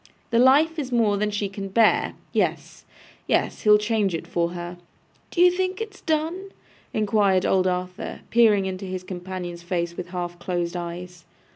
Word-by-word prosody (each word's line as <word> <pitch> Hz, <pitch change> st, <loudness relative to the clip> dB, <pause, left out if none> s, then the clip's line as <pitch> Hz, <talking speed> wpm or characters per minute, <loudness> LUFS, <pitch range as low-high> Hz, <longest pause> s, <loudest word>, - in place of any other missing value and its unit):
The 230 Hz, -, +3 dB
life 300 Hz, +6 st, +5 dB
is 265 Hz, -3 st, -4 dB
more 225 Hz, -4 st, +3 dB
than 210 Hz, +1 st, 0 dB
she 205 Hz, -1 st, -2 dB
can 195 Hz, 0 st, -6 dB
bear. 220 Hz, +3 st, +3 dB, 0.2 s
Yes, -, -, -1 dB, 0.4 s
yes. -, -, 0 dB
He'll 210 Hz, -1 st, +6 dB
change 210 Hz, -3 st, 0 dB
it 165 Hz, -, -5 dB
for 170 Hz, 0 st, -1 dB
her.' 175 Hz, 0 st, -7 dB, 0.5 s
'D'ye 360 Hz, 0 st, +5 dB
think 370 Hz, +1 st, -1 dB
it's 435 Hz, -3 st, -7 dB
done?' 330 Hz, +5 st, -1 dB, 0.4 s
inquired 205 Hz, -3 st, +2 dB
old 185 Hz, -1 st, +3 dB
Arthur, 180 Hz, 0 st, -3 dB
peering 215 Hz, -4 st, +5 dB
into 190 Hz, 0 st, -4 dB
his 185 Hz, -1 st, -5 dB
companion's 180 Hz, -1 st, -6 dB
face 170 Hz, -1 st, -2 dB
with 180 Hz, -, -6 dB
half 175 Hz, -1 st, -5 dB
closed 175 Hz, -1 st, -2 dB
eyes. 175 Hz, 0 st, -6 dB
195 Hz, 160 wpm, -24 LUFS, 180-230 Hz, 0.5 s, He'll